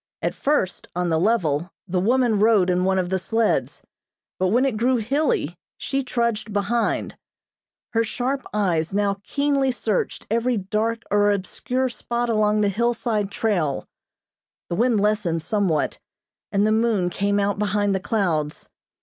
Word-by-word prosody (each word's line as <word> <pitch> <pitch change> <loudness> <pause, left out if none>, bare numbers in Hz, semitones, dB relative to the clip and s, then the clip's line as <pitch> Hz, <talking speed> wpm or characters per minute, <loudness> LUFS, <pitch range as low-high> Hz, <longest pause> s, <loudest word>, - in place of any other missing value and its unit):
At - - 0
first, 275 -11 -1
on 180 0 0
the 160 -1 +2
level, 175 -6 +1 0.2
the 180 0 0
woman 235 +1 +2
rode 205 -4 +4
in 180 0 +1
one 190 0 +2
of 180 -1 0
the 190 0 0
sleds, 225 +4 0 0.6
but 185 - +2
when 240 +8 +3
it 265 -5 0
grew 245 +4 +2
hilly, 235 - 0 0.2
she 275 0 -1
trudged 235 -3 -1
behind. 205 +3 0 0.8
Her 230 0 +3
sharp 255 +5 -2
eyes 185 -4 0
now 200 -1 +1
keenly 280 0 +1
searched 220 -5 -2
every 235 +1 +1
dark 215 +4 -1
or 205 0 +4
obscure 250 +6 -1
spot 240 -1 -2
along 215 -1 +2
the 205 - +3
hillside 225 -1 0
trail. 185 -10 -1 0.8
The 170 - -1
wind 235 +1 +2
lessened 200 -6 0
somewhat, 185 -4 0 0.5
and 200 0 +2
the 215 - +2
moon 220 -5 +2
came 200 +2 0
out 200 0 0
behind 205 -1 +1
the 190 - 0
clouds. 175 -8 -1
210 Hz, 150 wpm, -23 LUFS, 190-235 Hz, 0.8 s, rode